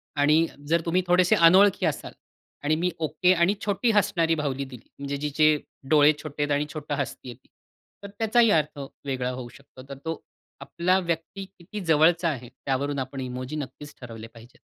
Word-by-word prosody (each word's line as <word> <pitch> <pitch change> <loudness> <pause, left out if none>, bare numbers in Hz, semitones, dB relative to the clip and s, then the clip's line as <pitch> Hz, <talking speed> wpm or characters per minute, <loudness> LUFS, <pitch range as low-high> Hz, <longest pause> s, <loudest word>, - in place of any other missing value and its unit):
आणि 150 +3 +3 0.2
जर 165 +2 +2
तुम्ही 175 +2 +2
थोडेसे 180 0 +4
अनोळखी 185 +3 +5
असाल 155 - -3 0.5
आणि 155 +1 +3
मी 180 - +2
ओके 155 +4 +2
आणि 170 +2 +3
छोटी 205 +4 +1
हसणारी 170 -6 +2
बाहुली 140 -2 -2
दिली 125 -3 -12
म्हणजे 140 0 -4
जिचे 150 +1 +2 0.4
डोळे 150 -1 +6
छोटे 150 -1 -3
आहेत 145 - -2
आणि 145 +1 0
छोटं 150 -2 -4
हसतीये, 130 -3 -5 0.7
तर 200 - -7
त्याचाही 230 +1 +4
अर्थ 150 -1 -2 0.3
वेगळा 130 -2 -2
होऊ 125 -1 -7
शकतो. 135 -1 -15
तर 140 - -7
तो 165 -1 -4 0.4
आपला 180 +2 +1
व्यक्ती 170 +2 -4
किती 180 +4 -8
जवळचा 165 +2 +4
आहे 125 -5 -5
त्यावरून 140 +2 -3
आपण 130 +1 -5
इमोजी 130 +2 -5
नक्कीच 145 0 -7
ठरवले 115 -2 -9
पाहिजेत. 115 +1 -16
150 Hz, 165 wpm, -25 LUFS, 135-170 Hz, 0.7 s, डोळे